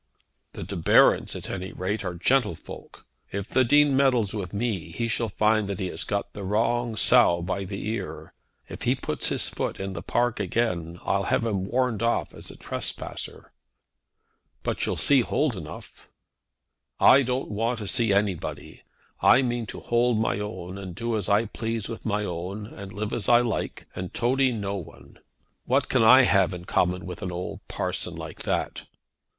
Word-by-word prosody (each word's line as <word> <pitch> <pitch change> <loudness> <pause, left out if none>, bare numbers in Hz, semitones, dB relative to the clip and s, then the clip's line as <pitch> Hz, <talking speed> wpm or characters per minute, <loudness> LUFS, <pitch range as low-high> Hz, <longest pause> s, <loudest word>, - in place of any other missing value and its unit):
"The - - -6
De 100 - -6
Barons, 85 - +4
at - - -7
any 95 0 -5
rate, 100 +4 -2
are 90 -2 -4
gentlefolk. 105 - -2 0.3
If 100 +1 -4
the 130 - +3
Dean 145 +2 +4
meddles 125 -7 +3
with 95 -5 -4
me, 100 -5 -2
he 115 +8 -2
shall 115 0 0
find 105 +1 +2
that 100 - -3
he 95 - -2
has - - -2
got 100 -1 -3
the 105 - -7
wrong 115 +3 0
sow 85 -4 +4
by 95 +2 -2
the 100 +2 -5
ear. 110 -4 -5 0.3
If - - -9
he - - +2
puts - - -2
his - - +4
foot - - -3
in 95 0 -4
the - - -5
park 120 -2 0
again 90 -5 -1
I'll 100 -1 0
have 115 - +1
him 100 -4 -1
warned 125 -2 0
off 115 0 0
as - - -10
a - - -10
trespasser." - - -5 1.1
"But - - 0
you'll - - 0
see - - +4
Mr. - - -3
Holdenough?" - - -3 0.9
"I 135 - +7
don't 125 +1 -2
want 115 +4 -1
to 105 -3 -5
see 115 +1 +1
anybody. 100 -3 -2 0.4
I 130 - +6
mean 120 -2 -2
to - - -8
hold 120 0 +2
my 110 -2 0
own, 100 -3 -6
and 95 -3 -7
do 115 +2 -2
as 105 -2 -2
I 105 +3 +3
please 115 0 -3
with 115 0 -6
my 105 -1 0
own, 90 +4 -5
and 100 -3 -9
live 105 +2 -4
as 105 - -1
I 120 0 +7
like, 120 -2 -3
and 90 -1 -5
toady 130 +2 +2
no 100 -3 -3
one. 90 - -12 0.5
What 135 +3 +1
can 130 - +3
I 130 +4 +8
have 100 -5 +3
in 90 0 -9
common 90 +2 0
with 90 -1 -7
an 90 - -3
old 90 +1 -5
parson - - -2
like - - -8
that?" - - -2
105 Hz, 185 wpm, -26 LUFS, 95-120 Hz, 1.1 s, I